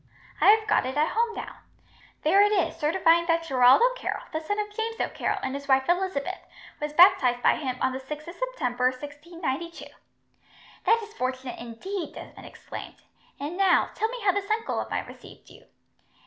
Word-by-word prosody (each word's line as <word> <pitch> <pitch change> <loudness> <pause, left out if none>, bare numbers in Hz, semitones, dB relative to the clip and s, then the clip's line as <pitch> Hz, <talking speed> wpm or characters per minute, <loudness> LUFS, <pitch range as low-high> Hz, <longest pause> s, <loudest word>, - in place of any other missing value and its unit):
I - - +5
have 435 +1 +6
got 425 - +2
it 260 +2 -4
at 305 +1 +2
home 460 0 0
now. - - -7 0.7
There 375 +6 +5
it 415 0 +4
is, 385 -5 +1
certifying 335 +1 +2
that 330 -1 +2
Gerald 260 - +5
O'Carroll, - - -1
the 315 - -1
son 365 +6 -3
of 415 0 -4
James 450 0 -3
O'Carroll - - -1
and 265 - -2
his 280 0 -6
wife 265 -1 +3
Elizabeth, 355 -5 -1 0.4
was 300 0 -3
baptized 260 -7 +5
by - - +5
him 260 -4 -3
on 260 - +1
the 260 - -4
6th 300 +4 -8
of 340 - -7
September, 265 - -2
1692." 290 +4 -4 1.0
"That 455 0 +4
is 430 0 -11
fortunate, 255 - -4
indeed," 330 - -6
Desmond - - -11
exclaimed. - - -10 0.4
"And 295 +5 -4
now, 380 -1 +3
tell 440 - 0
me - - -6
how 400 -2 +3
this 400 +1 -3
uncle 445 +1 -1
of - - -4
mine - - -2
received - - -14
you." - - -17
335 Hz, 185 wpm, -26 LUFS, 265-410 Hz, 1.0 s, have